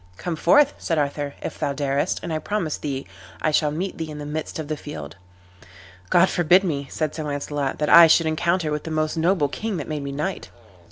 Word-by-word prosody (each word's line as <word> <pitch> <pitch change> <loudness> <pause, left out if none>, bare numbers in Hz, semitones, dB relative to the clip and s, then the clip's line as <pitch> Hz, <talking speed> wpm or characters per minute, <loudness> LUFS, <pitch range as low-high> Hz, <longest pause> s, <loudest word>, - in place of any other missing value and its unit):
"Come 175 -2 -3
forth," 285 - +4
said 165 - -1
Arthur, 145 -1 -2
"if - - -6
thou 140 - -1
darest, 140 0 -1
and 165 - -3
I 155 - -1
promise 180 -5 -2
thee 140 -2 -4 0.3
I 155 - +1
shall 150 0 +2
meet 170 +6 -4
thee 160 -1 -4
in 150 - -7
the 145 - -6
midst 150 +1 -4
of 155 -2 -5
the 155 - -2
field." 150 0 -8 0.9
"God 175 +2 +5
forbid 175 +2 +4
me," 140 -6 -2
said 155 -2 -2
Sir 155 - -5
Launcelot, 145 -1 -3
"that 150 - -1
I 170 -1 +10
should 165 +1 +4
encounter 160 +1 0
with 150 0 -2
the - - -6
most 155 0 -1
noble 165 -2 +2
king 210 +7 -4
that - - -5
made 150 -2 -3
me 140 0 -5
knight." 150 +7 -4
155 Hz, 220 wpm, -23 LUFS, 145-170 Hz, 0.9 s, I